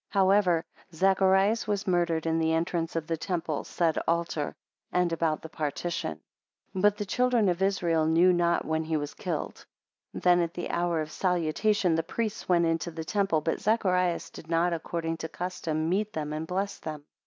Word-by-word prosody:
16 200 - -1
However 190 -3 +4 0.3
Zacharias 195 +4 +3
was 205 -1 -1
murdered 170 -3 +1
in 165 0 +1
the 160 0 +2
entrance 165 0 -1
of 165 -1 -1
the 165 0 -2
temple 165 -3 -2
said 165 -3 0
altar, 165 -2 -1 0.4
and 180 -2 +1
about 160 -2 0
the - - -6
partition; 155 - -3 0.5
17 185 - -3
But 205 +1 +4
the 205 - -3
children 245 0 +2
of 175 +1 -1
Israel 170 -5 +2
knew 170 +3 +5
not 170 -1 +1
when 160 0 0
he 160 0 -1
want 145 -1 -5
killed. - - -4 0.5
18 - - -5
Then 180 -1 +5
at 170 +1 -2
the 175 - -4
hour 170 -2 0
of 155 0 -5
salutation 180 +2 +1
the 165 - +2
priests 210 +6 -4
went 170 -1 +4
into 165 +1 0
the 160 -1 -6
temple 195 -4 +1
but 165 +2 -2
Zacharias 185 -5 +1
did 160 - -12
not 170 +1 +2
according 165 0 -3
to 160 - -5
custom, 160 -3 -3
meet 205 +5 0
them 150 -1 -3
and 155 +1 -4
bless 195 +3 -2
them. 155 -2 -7
170 Hz, 190 wpm, -28 LUFS, 160-190 Hz, 0.5 s, knew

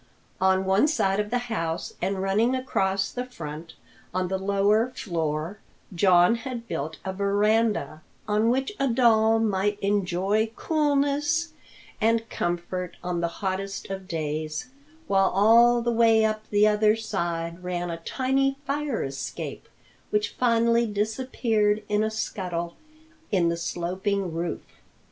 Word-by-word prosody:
On 190 0 +3
one 195 +8 +4
side 200 -11 +1
of 210 0 -1
the 245 - +1
house 165 -8 -3
and 190 +1 -1
running 215 +6 +2
across 195 -7 0
the 250 - -3
front 165 -9 -8 0.4
on 185 -1 0
the 190 0 -1
lower 200 +4 +2
floor, 165 0 -3 0.3
John 180 +4 +4
had 235 -1 -6
built 155 +3 -4
a 190 - -2
veranda, 205 -4 +1 0.3
on 215 +2 +2
which 265 +9 0
a 275 - +2
doll 225 -2 +4
might 205 -2 0
enjoy 200 +1 +1
coolness 295 +2 +1 0.5
and 225 +1 +2
comfort 175 +1 -3
on 175 -1 -2
the 170 - +1 0.2
hottest 195 +1 -3
of 190 -1 -6
days, 155 +6 -3 0.3
while 195 -5 +3
all 235 +4 +5
the 240 - +1
way 225 -1 +4
up 215 0 -2
the 210 0 +4
other 210 0 +3
side 170 -5 -3
ran 175 -1 -3
a 165 - -4
tiny 270 +8 0
fire 285 -3 -1
escape, 135 0 -6 0.4
which 210 0 0
finally 235 -1 +2
disappeared 215 0 0
in 210 +1 +1
a 220 - +1
scuttle 180 -6 -4 0.6
in 180 -4 +3
the 170 - -1
sloping 185 +2 -2
roof. 170 +1 -3
205 Hz, 135 wpm, -26 LUFS, 180-230 Hz, 0.6 s, all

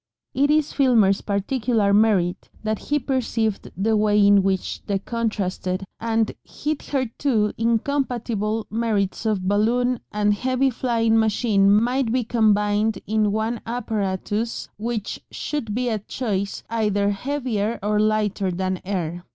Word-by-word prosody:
It 285 +2 +2
is 300 -1 +2
Filmer's 225 -8 +4
particular 210 0 0
merit 200 -5 +2
that 215 -1 -1
he 295 - +3
perceived 230 -6 -1
the 220 +3 +2
way 210 -1 +4
in 200 0 +6
which 190 -1 -2
the 200 -2 +1
contrasted 195 -4 -2 0.2
and 225 -1 0
hitherto 265 -6 -1
incompatible 230 -2 -1
merits 220 -2 -1
of 195 -4 0
balloon 235 +5 +2
and 210 0 +2
heavy 260 +5 +1
flying 230 -2 +1
machine 210 -2 +3
might 235 +3 +2
be 250 +1 +1
combined 210 -2 +2
in 215 0 +1
one 220 +2 -1
apparatus, 220 -1 -2
which 225 -2 -3
should 225 -9 -4
be 250 +1 0
at 215 -2 -4
choice 200 -6 -2
either 210 -3 +1
heavier 235 -2 -2
or 210 0 +1
lighter 210 -2 +1
than 185 +1 -2
air. 175 -3 -3
215 Hz, 125 wpm, -23 LUFS, 205-235 Hz, 0.2 s, in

